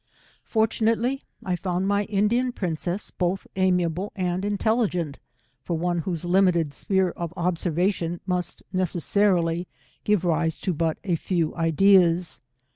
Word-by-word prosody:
Fortunately 225 +3 +1 0.2
I 180 - 0
found 180 +1 -2
my 205 0 +1
Indian 220 +5 +1
princess 175 0 -3
both 180 +1 -1
amiable 180 0 +1
and 180 -1 -1
intelligent, 205 - 0 0.4
for 170 +4 -2
one 175 +1 0
whose 170 0 -3
limited 175 -4 +3
sphere 190 0 +1
of 170 -1 -5
observation 175 0 0
must 180 -2 -2
necessarily 180 -1 +1 0.4
give 210 -4 +2
rire 165 -1 +2
to 185 - 0
but 160 0 0
a 180 -4 +1
4cw 170 -2 -1
ideas. 175 +1 +3
180 Hz, 120 wpm, -25 LUFS, 170-195 Hz, 0.4 s, limited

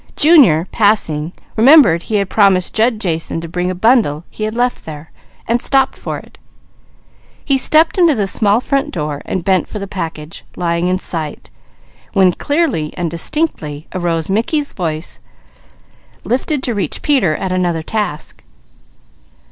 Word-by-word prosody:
Junior, 275 - +5
passing, 175 -8 +1 0.2
remembered 240 - +6
he 215 - -4
had 200 -2 +1
promised 195 -3 +2
Jud 225 0 +1
Jason 165 -4 -2
to 165 - -7
bring 180 +2 -2
a 185 - -3
bundle 195 - +2
he 215 - -4
had 215 +1 -4
left 245 +1 -1
there, 155 0 -10 0.4
and 235 +1 +1
stopped 270 -1 +1
for - - -5
it. - - -15 1.1
He 275 - +2
stepped 315 +7 +3
into 335 -5 +4
the 205 -3 0
small 205 +2 +3
front 275 +3 -1
door 150 - -4
and 185 - -3
bent 190 0 +1
for - - -7
the 200 - -5
package 165 -5 -7
lying 170 0 -1
in 185 0 +1
sight, 160 -5 -5 0.6
when 190 -3 +4
clearly 280 - -1
and 175 -3 -2
distinctly 165 - -2
arose 170 -3 -1
Mickey's 285 - -1
voice 160 -3 -4 1.0
lifted 265 +3 -1
to 245 - -1
reach 195 -8 -3
Peter, 215 - +2
at 190 - -4
another 175 -3 -1
task. 205 -6 -4
190 Hz, 150 wpm, -16 LUFS, 165-245 Hz, 1.1 s, remembered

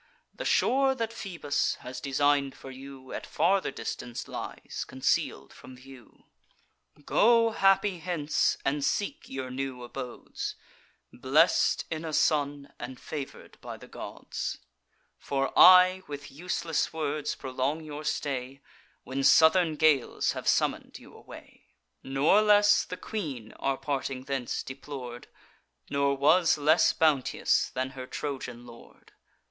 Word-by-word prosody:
The - - -7
shore 270 0 +3
that 230 -2 -3
Phoebus 170 -10 -2
has 125 +1 -7
design'd 140 -1 +1
for 135 - -10
you, 135 0 -11
At - - -6
farther 195 +2 +1
distance 120 -1 -6
lies, - - -6
conceal'd 130 0 -1
from 130 - -13
view. 130 -2 -16 0.8
Go 230 0 +4
happy 195 -2 +2
hence, 160 -3 0
and 140 +1 0
seek 220 - -2
your 130 -1 -5
new 130 -1 -4
abodes, 125 0 -6 0.6
Blest - - +3
in 160 0 -3
a 160 -1 -5
son, 145 -2 0
and 130 -1 -7
favour'd 145 -3 -8
by - - -7
the - - -14
gods: - - -6 0.6
For 135 -1 -2
I 185 0 +8
with 145 -1 -8
useless 165 +1 -2
words 150 -2 -2
prolong 135 +4 -3
your 150 0 -7
stay, 135 -3 -3 0.4
When 135 +2 -3
southern 160 +2 +5
gales 150 -4 +2
have - - -6
summon'd - - 0
you - - -16
away.' - - -14 0.3
"Nor 140 +10 +3
less 210 -1 +5
the 180 - -7
queen 140 - -5
our 135 -1 0
parting 135 -2 -3
thence 135 -3 -3
deplor'd, 130 -3 -8 0.6
Nor 140 0 +1
was 160 +4 +4
less 155 +3 +4
bounteous 150 -5 +1
than 130 +1 -2
her 130 -2 -8
Trojan 125 -5 -5
lord. 120 -1 -16
145 Hz, 130 wpm, -28 LUFS, 130-165 Hz, 0.8 s, I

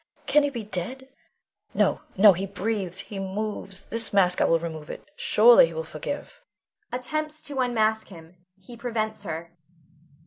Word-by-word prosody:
Can 300 - +4
he 285 - +1
be 240 -5 -6
dead? 245 +7 -4 0.7
No, - - +2 0.2
no! 200 +1 +8
he 190 +3 -4
breathes, 195 -1 -3
he 200 - -8
moves; 195 0 -5
this 230 0 +2
mask, 180 -3 +3
I - - +5
will 165 - +4
remove 160 -2 -7
it, - - -9
surely 485 +1 +6
he - - -9
will 485 - -3
forgive. - - -7 0.5
[_Attempts 305 +5 -3
to 285 -2 -4
unmask 220 -3 +1
him; 170 -1 -14 0.2
he 235 +6 -12
prevents 225 -3 -3
her. 165 0 -6
215 Hz, 160 wpm, -25 LUFS, 190-265 Hz, 0.7 s, no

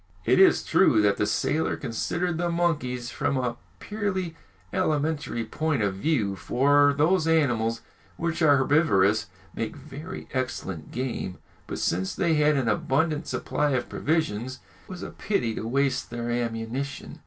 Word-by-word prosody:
It - - +4
is 380 -2 +6
true 130 - +4
that 100 -1 +3
the 105 - +1
sailor 150 +8 0
considered 165 +9 -2
the 175 0 0
monkeys 145 -8 -1
from 140 - -1
a 125 -2 -1 0.2
purely 195 -5 -3 0.4
alimentary 150 -8 0
point 155 -7 -1
of 100 -2 +1
view, 105 -2 0
for 145 +6 +3
those 160 +2 +3
animals 120 -8 +2 0.4
which 170 0 -2
are 145 -3 +6
herbivorous 110 - +3 0.3
make 110 -1 -4
very 155 +6 -8
excellent 95 - -3
game; 125 -7 -3 0.3
but - - -4
since 95 +2 -1
they 170 -4 +2
had 150 -1 +3
an 130 -4 0
abundant 145 +8 +1
supply 145 -1 -1
of 125 - -1
provisions, 130 -6 -1 0.3
it - - -24
was 185 -2 -7
a - - -6
pity 125 - -1
to 110 - -4
waste 135 +2 0
their 120 0 -3
ammunition. 120 +3 -3
140 Hz, 150 wpm, -26 LUFS, 115-160 Hz, 0.4 s, is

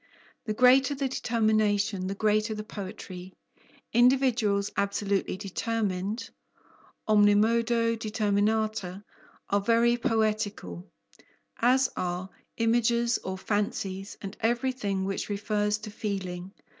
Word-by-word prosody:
The 215 -2 -2
greater 260 +4 +5
the 275 0 -1
determination, 215 -5 +1
the 195 - -3
greater 215 +1 +1
the 215 - -5
poetry; 190 -3 -8 0.6
individuals 240 -5 +3
absolutely 200 -1 -1
determined 205 +1 -2 0.8
(omnimodo 230 +2 +3
determinata) 215 -2 0 0.5
are 200 0 +3
very 235 +2 +3
poetical, 215 - -1 0.7
as 255 +2 +4
are 180 +1 -3 0.3
images 235 +1 +2
or 190 0 -5
fancies, 195 -1 -3
and 195 +1 -6
everything 235 -5 0
which 195 +1 -3
refers 210 0 0
to 215 0 -9
feeling. 190 -3 -4
215 Hz, 95 wpm, -28 LUFS, 200-230 Hz, 0.8 s, greater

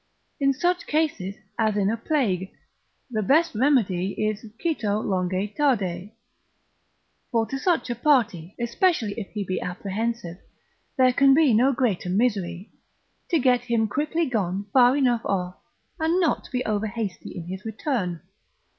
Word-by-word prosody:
In 275 -1 +3
such 350 +6 0
cases 295 -12 -1 0.2
as 215 -2 +2
in 200 0 +2
a - - 0
plague, 225 - -1 0.6
the 215 -2 0
best 315 - +3
remedy 210 -7 +2
is 215 0 -2 0.2
cito 220 -12 0
longe 190 0 -1
tarde: 200 -10 0 1.2
(for 230 -2 +1
to 270 +4 -4
such 335 -5 +1
a - - -2
party, 225 - +1
especially 240 - +1
if 200 - -5
he 210 -2 -2
be 185 -1 -3
apprehensive, 195 0 -4 0.6
there 255 -1 +5
can 270 +1 +5
be 300 -5 +4
no 250 +5 +4
greater 235 -9 0
misery) 195 -3 -1 0.6
to 340 - +3
get 250 -3 +3
him 230 -2 +1
quickly 305 +8 -1
gone 200 -5 -1
far 255 +1 +6
enough 245 -4 +2
off, 180 -2 -2 0.4
and 325 +3 +2
not 340 -4 +1
to - - -14
be 250 -1 -1
overhasty 215 -1 -3
in 175 - -5
his 190 +2 -6
return. 220 - -2
225 Hz, 145 wpm, -25 LUFS, 195-270 Hz, 1.2 s, far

